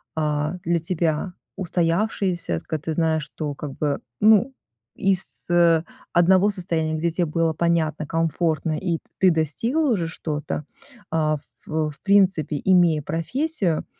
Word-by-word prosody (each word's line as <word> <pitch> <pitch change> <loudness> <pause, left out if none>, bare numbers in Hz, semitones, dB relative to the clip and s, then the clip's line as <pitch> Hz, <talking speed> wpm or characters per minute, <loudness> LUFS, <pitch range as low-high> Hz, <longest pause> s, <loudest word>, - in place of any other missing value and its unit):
а, 150 +1 0
для 170 0 +1
тебя 170 +1 -1 0.2
устоявшиеся, 175 - 0
т - - -22
когда 155 -2 -3
ты 160 - -2
знаешь, 160 -2 +1
что 150 -1 -5
как 145 -1 -6
бы 145 -2 0 0.2
ну 220 +5 +5 0.4
из, 190 -2 -2
э, 170 -2 +4 0.3
одного 185 +4 +5
состояния, 165 -5 -2
где 170 +1 0
тебе 175 +1 +1
было 165 +1 +1
понятно, 160 -2 0
комфортно 165 -1 0
и 170 -3 -1 0.2
ты 190 - +6
достигла 230 - 0
уже 175 -7 0
что-то, 150 -2 -4 0.5
а, 155 -1 +1
ф 145 - -15
в 155 -1 -1
принципе 190 -7 +3
имея 175 -5 +4
профессию, 185 - -1
165 Hz, 135 wpm, -23 LUFS, 155-185 Hz, 0.5 s, ты